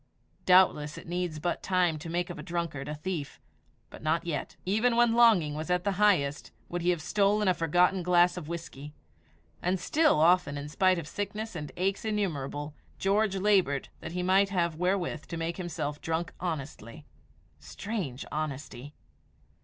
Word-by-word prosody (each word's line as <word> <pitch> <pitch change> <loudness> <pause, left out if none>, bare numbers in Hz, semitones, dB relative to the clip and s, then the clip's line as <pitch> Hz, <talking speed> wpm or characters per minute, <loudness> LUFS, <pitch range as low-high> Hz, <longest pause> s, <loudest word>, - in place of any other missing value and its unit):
Doubtless 180 -5 +4
it - - -10
needs 175 -2 -2
but 175 +3 -2
time 180 -4 +1
to 165 +2 -7
make 175 +1 -2
of 175 - -8
a - - -5
drunkard 170 -6 -4
a 150 - -4
thief, 155 -2 -5 0.5
but - - -11
not 160 +2 0
yet, 165 -4 -4
even 220 +6 +2
when 240 -1 +4
longing 220 -11 +5
was 155 +3 -5
at 180 0 +1
the 200 - +1
highest, 150 -9 +2 0.2
would 175 0 -3
he 175 - +1
have 170 -3 0
stolen 205 +2 +2
a 185 - +5
forgotten 180 +3 +2
glass 175 0 +4
of 175 -5 -7
whisky; 155 -3 -7 0.7
and 180 +1 0
still, 310 - +3
often 165 -3 +3
in 145 +1 -6
spite 185 +3 +3
of 165 -3 -5
sickness 205 +4 -4
and 150 -3 -5
aches 195 +2 0
innumerable, 150 -9 -2 0.2
George 200 +1 +1
laboured 190 -9 +2
that 160 - -7
he 180 0 -2
might 190 +2 +4
have 170 -4 0
wherewith 180 -2 -1
to 170 - -5
make 165 +1 -3
himself 155 -5 -4
drunk 165 +1 -2
honestly. 145 - -5 0.5
Strange 145 - -5
honesty! 145 -2 -5
175 Hz, 170 wpm, -29 LUFS, 150-190 Hz, 0.7 s, longing